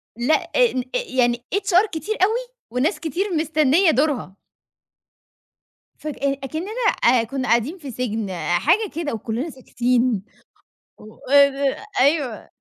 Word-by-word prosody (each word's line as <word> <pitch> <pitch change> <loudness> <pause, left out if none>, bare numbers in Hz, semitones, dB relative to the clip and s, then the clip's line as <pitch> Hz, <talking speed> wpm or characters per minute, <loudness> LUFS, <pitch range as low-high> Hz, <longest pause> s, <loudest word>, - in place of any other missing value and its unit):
لأ، 245 +7 +2 0.2
آ - - +2 0.4
آ - - +4
يعني 240 -2 +1
HR 400 0 +3
كتير 405 +7 -3
أوي 470 +5 +1 0.2
وناس 290 - 0
كتير 345 +5 -2
مستنية 315 +2 +3
دورها. 270 - -1 1.6
فك 305 -1 -6
أكننا 280 - -2 0.3
آآ 235 -1 +5
كُنا 260 +3 -4
قاعدين 240 +10 +1
في 290 -7 -8
سجن 220 -4 -3 0.3
حاجة 415 - +2
كده 320 -5 -3
وكلنا 230 +7 -3
ساكتين 245 -5 0 0.7
و 215 +1 -14 0.2
آآ 280 -1 +4 0.2
أيوه 280 -7 +1
275 Hz, 120 wpm, -22 LUFS, 240-325 Hz, 1.6 s, آآ